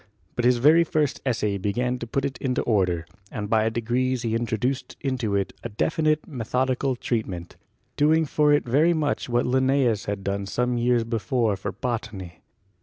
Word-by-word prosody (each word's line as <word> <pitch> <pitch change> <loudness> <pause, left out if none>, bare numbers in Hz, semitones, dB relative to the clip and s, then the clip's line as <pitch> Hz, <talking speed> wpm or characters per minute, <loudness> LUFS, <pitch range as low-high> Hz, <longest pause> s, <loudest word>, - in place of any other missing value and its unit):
But 120 - 0
his 125 0 +5
very 155 +7 +6
first 150 -3 -1
essay 105 -5 0
began 125 +6 -1
to 120 - -6
put 135 +4 -1
it 130 -3 -4
into 130 -2 -1
order, 90 -7 +1 0.3
and 105 -1 -4
by 110 +1 +2
degrees 120 +2 -1
he 115 -1 -1
introduced 120 +3 -2
into 125 -7 -1
it 100 -1 -1
a 120 - -4
definite 155 +7 0
methodical 130 0 -1
treatment, 100 -8 -3 0.4
doing 155 +2 +4
for 150 0 +2
it 145 -1 +3
very 150 +8 +4
much 150 -5 -1
what 120 0 +1
Linnaeus 130 -4 +2
had 100 -1 -3
done 100 0 -2
some 125 +4 0
years 120 0 +2
before 115 -1 0
for 95 - -4
botany. 105 -8 -5
120 Hz, 170 wpm, -25 LUFS, 110-135 Hz, 0.4 s, very